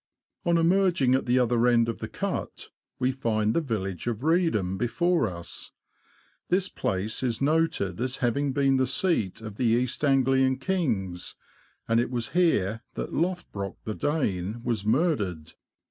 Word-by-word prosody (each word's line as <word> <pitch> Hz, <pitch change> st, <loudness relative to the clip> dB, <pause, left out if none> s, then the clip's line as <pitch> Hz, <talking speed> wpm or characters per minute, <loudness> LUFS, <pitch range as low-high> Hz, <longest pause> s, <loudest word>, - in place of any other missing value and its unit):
On 170 Hz, 0 st, +4 dB
emerging 170 Hz, -6 st, +3 dB
at 130 Hz, -, +1 dB
the 125 Hz, +1 st, +3 dB
other 120 Hz, -1 st, +3 dB
end 120 Hz, -1 st, +4 dB
of 115 Hz, -, -3 dB
the -, -, -4 dB
Cut, -, -, -4 dB, 0.3 s
we 130 Hz, +1 st, +1 dB
find 110 Hz, -4 st, 0 dB
the 170 Hz, -, +2 dB
village 100 Hz, -, -3 dB
of 120 Hz, 0 st, -2 dB
Reedham 160 Hz, -, +2 dB
before 165 Hz, -, +1 dB
us. 85 Hz, -3 st, -7 dB, 0.8 s
This 185 Hz, +1 st, +1 dB
place 95 Hz, +4 st, -2 dB
is 120 Hz, -4 st, -1 dB
noted 155 Hz, -, +1 dB
as 130 Hz, +1 st, -1 dB
having 135 Hz, +3 st, 0 dB
been 135 Hz, 0 st, +2 dB
the 130 Hz, 0 st, +2 dB
seat 140 Hz, -, 0 dB
of 110 Hz, -2 st, -8 dB
the 125 Hz, -, 0 dB
East 120 Hz, +4 st, +1 dB
Anglian 135 Hz, -1 st, +3 dB
kings, 115 Hz, -, -2 dB, 0.5 s
and 115 Hz, 0 st, +3 dB
it 120 Hz, -, 0 dB
was 120 Hz, -1 st, -1 dB
here 115 Hz, -, +2 dB
that -, -, -4 dB
Lothbrock 160 Hz, -, -2 dB
the 110 Hz, -, -3 dB
Dane 110 Hz, -, -2 dB
was 115 Hz, -4 st, -1 dB
murdered. 105 Hz, -, 0 dB
125 Hz, 155 wpm, -27 LUFS, 110-150 Hz, 0.8 s, On